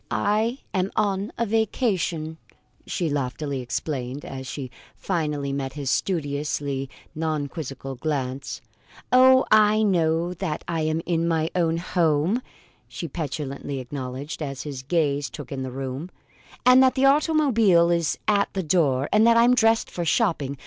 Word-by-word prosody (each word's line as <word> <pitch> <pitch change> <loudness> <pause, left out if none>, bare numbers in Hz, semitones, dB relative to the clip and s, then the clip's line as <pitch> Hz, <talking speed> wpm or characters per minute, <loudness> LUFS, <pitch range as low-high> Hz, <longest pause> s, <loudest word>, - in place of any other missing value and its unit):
"I 220 +4 +1 0.2
am 190 -1 0
on 200 -1 0
a 235 - +1
vacation," 195 - -1 0.5
she 175 - -1
loftily 140 -1 -2
explained, 125 +2 -4
as 130 -1 -7
she 130 -1 -6 0.2
finally 150 -6 -2
met 135 -1 -3
his 140 -3 -2
studiously 145 -5 -2 0.2
non 155 -2 -1
quizzical 135 -3 -6
glance. 135 -1 -3 0.5
"Oh, 260 +1 +6
I 215 0 +5
know 170 -3 +1
that 175 -4 -4
I 165 -2 -1
am 155 +1 0
in 170 -1 0
my 160 -1 0
own 165 -2 +1
home!" 170 +4 +1 0.5
she 170 - -6
petulantly 140 -2 -4
acknowledged, 130 +3 -6
as 140 -3 -4
his 140 -4 -6
gaze 145 -1 0
took 145 -2 -9
in 135 -1 -4
the 130 - -4
room; 135 +5 -5 0.6
"and 250 +1 +7
that 260 -1 +4
the 265 0 +3
automobile 270 - +4
is 170 -2 +1
at 200 -1 +2
the 190 - -2
door; 145 -5 +2
and 215 +2 +5
that 230 0 +5
I'm 240 +2 +6
dressed 225 -2 +3
for 175 - -3
shopping. 160 - 0
160 Hz, 150 wpm, -24 LUFS, 140-200 Hz, 0.6 s, and